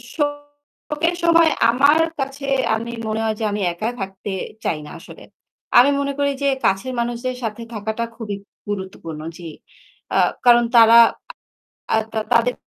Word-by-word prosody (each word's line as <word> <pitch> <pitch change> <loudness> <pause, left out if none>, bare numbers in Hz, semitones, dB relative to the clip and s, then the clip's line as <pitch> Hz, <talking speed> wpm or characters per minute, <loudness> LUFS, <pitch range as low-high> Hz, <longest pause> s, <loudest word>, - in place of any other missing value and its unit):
শোকের 290 +2 -3
সময় 335 -1 +5 0.2
আমার 280 +6 +4 0.2
কাছে 275 +1 -4 0.3
আমি 230 +1 -5 0.2
মনে 220 0 -2
হয় 220 -1 0
যে - - -3
আমি 205 0 -3
একা 195 +6 -4
থাকতে 195 +1 -6 0.3
চাই 160 - -1
না 150 - -10
আসলে। - - -13 0.5
আমি 250 +3 +7
মনে 280 0 -1
করি 285 0 +2
যে 280 - +1 0.2
কাছের 195 +7 0
মানুষদের 240 +2 -2
সাথে 225 0 -4
থাকাটা 220 +2 -3
খুবই 220 -3 -5 0.3
গুরুত্বপূর্ণ 190 -6 -6 0.2
জি। 170 -2 -8 0.7
আ - - +3 0.3
কারণ 240 -1 +6
তারা 230 0 +8 1.0
আ - - +5 0.2
তা 220 - 0
তাদের 235 +1 +2
235 Hz, 145 wpm, -20 LUFS, 215-280 Hz, 1.0 s, তারা